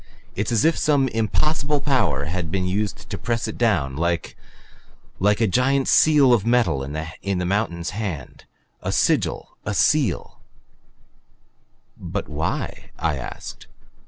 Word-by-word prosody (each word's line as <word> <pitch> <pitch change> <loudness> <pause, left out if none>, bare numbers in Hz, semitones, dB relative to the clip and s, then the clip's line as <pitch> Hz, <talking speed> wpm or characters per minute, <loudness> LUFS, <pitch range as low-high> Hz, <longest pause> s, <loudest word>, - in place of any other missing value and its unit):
It's 105 +6 -1
as 115 +2 +2
if 165 - +3
some 145 -3 +3
impossible 145 +7 0
power 115 - +1
had 85 +1 -3
been 90 +2 -1
used 100 +3 -2
to - - -3
press 115 -2 -1
it - - -5
down. 85 - +1
Like 85 +2 -1 0.8
like 105 +2 +3
a 115 - +4
giant 130 +6 +2
seal 145 -5 +5
of 110 -5 +3
metal 115 - +2
in 80 +6 -4
a - - -1
mountain's 90 -3 -1
hand. 95 - -5 0.4
A - - -2
sigil - - 0
a 105 - -3
seal 140 - +1 0.9
" - - -40 0.2
"But - - -1
why?" - - -3
I 80 -4 0
asked. 65 - -8
105 Hz, 140 wpm, -23 LUFS, 85-125 Hz, 0.9 s, seal